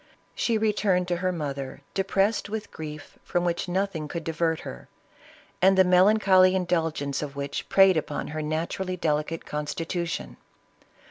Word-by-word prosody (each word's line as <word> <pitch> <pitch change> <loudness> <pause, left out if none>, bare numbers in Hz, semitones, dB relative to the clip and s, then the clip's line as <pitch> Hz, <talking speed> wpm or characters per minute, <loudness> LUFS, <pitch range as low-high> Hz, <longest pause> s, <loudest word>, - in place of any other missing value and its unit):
She 230 -2 +1
returned 205 -4 +1
to 175 - +1
her 185 +1 0
mother, 140 -5 -5
depressed 195 +2 +1
with 215 0 -5
grief 150 -1 -9
from 175 0 -1
which 175 +1 -1
nothing 180 -4 -1
could 170 +2 -5
divert 165 0 -1
her, 60 - -9 0.7
and 190 +1 +5
the 190 - +8
melancholy 185 0 +5
indulgence 165 -6 -1
of 145 -2 -5
which 140 0 -4
preyed 195 -3 +6
upon 150 -1 -3
her 155 +1 -4
naturally 170 +4 -2
delicate 155 0 -1
constitution. 165 +3 -4
170 Hz, 140 wpm, -26 LUFS, 155-190 Hz, 0.7 s, the